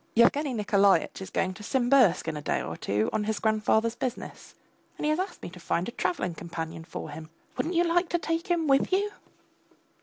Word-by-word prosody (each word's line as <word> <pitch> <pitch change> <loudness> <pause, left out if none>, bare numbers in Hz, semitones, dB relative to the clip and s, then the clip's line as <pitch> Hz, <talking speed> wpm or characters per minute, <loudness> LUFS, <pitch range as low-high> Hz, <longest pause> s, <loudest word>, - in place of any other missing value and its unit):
Yevgeny 280 +5 +4
Nikolaitch 200 -3 +2
is 190 - -6
going 185 0 -1
to 210 - -12
Simbirsk 245 -6 +3
in 160 - -2
a 150 - -5
day - - 0
or - - -5
two 105 +2 0
on 210 - 0
his 220 -1 -1
grandfather's 220 +1 +2
business, 250 0 -6 0.4
and - - -3
he 305 - +3
has 310 - 0
asked 380 +2 -4
me - - -5
to 180 - -12
find 170 +1 -1
a - - -4
travelling 185 -3 -1
companion 165 -1 -6
for 160 - -7
him; 155 +1 -9 0.3
wouldn't 340 +3 -2
you 340 - +4
like 350 +1 +1
to 345 - +1
take 330 +2 -2
him 345 -3 +1
with 275 +2 +3
you? 405 +2 +1
220 Hz, 210 wpm, -27 LUFS, -, 0.4 s, Yevgeny